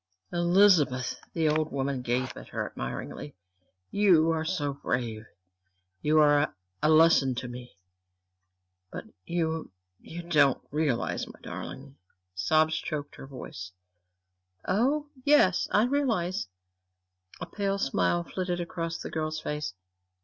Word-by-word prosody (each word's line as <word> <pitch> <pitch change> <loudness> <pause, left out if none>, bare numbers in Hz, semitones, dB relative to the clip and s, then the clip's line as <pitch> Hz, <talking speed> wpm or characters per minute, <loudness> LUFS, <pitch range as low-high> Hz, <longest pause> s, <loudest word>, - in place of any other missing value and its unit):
"Elizabeth!" 175 -8 +3
The 160 -2 +1
older 155 0 +1
woman 135 -2 -2
gazed 125 +1 -1
up - - -13
at - - -10
her - - -3
admiringly. 75 - -6 0.6
"You 175 -6 +4
are 160 -1 0
so 150 -5 -1
brave 115 -5 -3 0.7
you 155 +1 +3
are 145 -3 +4 0.3
a 150 - +3
lesson 155 -5 +5
to 125 0 -4
me! 125 -1 -10 1.1
But - - -6 0.2
you 160 -2 -1 0.3
you 170 +1 -8
don't 150 -6 +3
realize, 145 -5 0
my - - -13
darling 140 +1 -8 0.2
" 90 0 -53
sobs 155 +12 +2
choked 145 -1 -5
her 135 - -9
voice. 95 -9 -8 0.9
"Oh, 280 +9 +1
yes 285 -11 +4
I 210 +2 +4
realize." 230 - 0 0.9
A - - -4
pale 200 -1 -2
smile 90 - +1
flitted 180 - -3
across 165 -1 -3
the - - -7
girl's 155 -1 -2
face. 150 - -4
155 Hz, 130 wpm, -28 LUFS, 130-175 Hz, 1.1 s, lesson